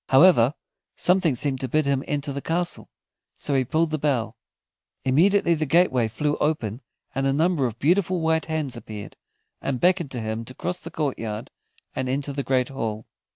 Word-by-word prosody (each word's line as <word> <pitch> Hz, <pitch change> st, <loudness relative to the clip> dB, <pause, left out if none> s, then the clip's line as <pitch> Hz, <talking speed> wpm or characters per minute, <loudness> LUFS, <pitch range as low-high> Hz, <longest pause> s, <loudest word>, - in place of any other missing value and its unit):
However, 135 Hz, -2 st, +6 dB, 0.4 s
something 180 Hz, -6 st, +2 dB
seemed 135 Hz, +1 st, -1 dB
to 130 Hz, -, -2 dB
bid 155 Hz, +4 st, +1 dB
him 140 Hz, -1 st, +1 dB
enter 145 Hz, -1 st, -2 dB
the 140 Hz, -, -4 dB
castle, 170 Hz, +3 st, -2 dB, 0.5 s
so 145 Hz, -, -3 dB
he 135 Hz, -1 st, +3 dB
pulled 160 Hz, +5 st, +1 dB
the 155 Hz, -, -1 dB
bell. 135 Hz, -7 st, 0 dB, 0.7 s
Immediately 170 Hz, +7 st, +4 dB
the 155 Hz, -2 st, -1 dB
gateway 135 Hz, -7 st, +3 dB
flew 145 Hz, +7 st, -1 dB
open, 130 Hz, -7 st, -1 dB, 0.3 s
and 135 Hz, +1 st, 0 dB
a -, -, +3 dB
number 155 Hz, -1 st, +2 dB
of 115 Hz, -2 st, -7 dB
beautiful 180 Hz, +6 st, +2 dB
white 160 Hz, 0 st, +1 dB
hands 155 Hz, -5 st, -2 dB
appeared, 110 Hz, -3 st, -8 dB, 0.5 s
and 135 Hz, -2 st, -2 dB
beckoned 175 Hz, -2 st, +2 dB
to 125 Hz, -, -3 dB
him 110 Hz, 0 st, -3 dB
to 130 Hz, -, -9 dB
cross 180 Hz, +1 st, -3 dB
the -, -, -8 dB
courtyard 115 Hz, -8 st, -3 dB, 0.4 s
and 130 Hz, -1 st, -2 dB
enter 140 Hz, +2 st, -1 dB
the 140 Hz, -, -2 dB
great 130 Hz, -2 st, +1 dB
hall. 115 Hz, -5 st, -4 dB
140 Hz, 180 wpm, -24 LUFS, 125-160 Hz, 0.7 s, However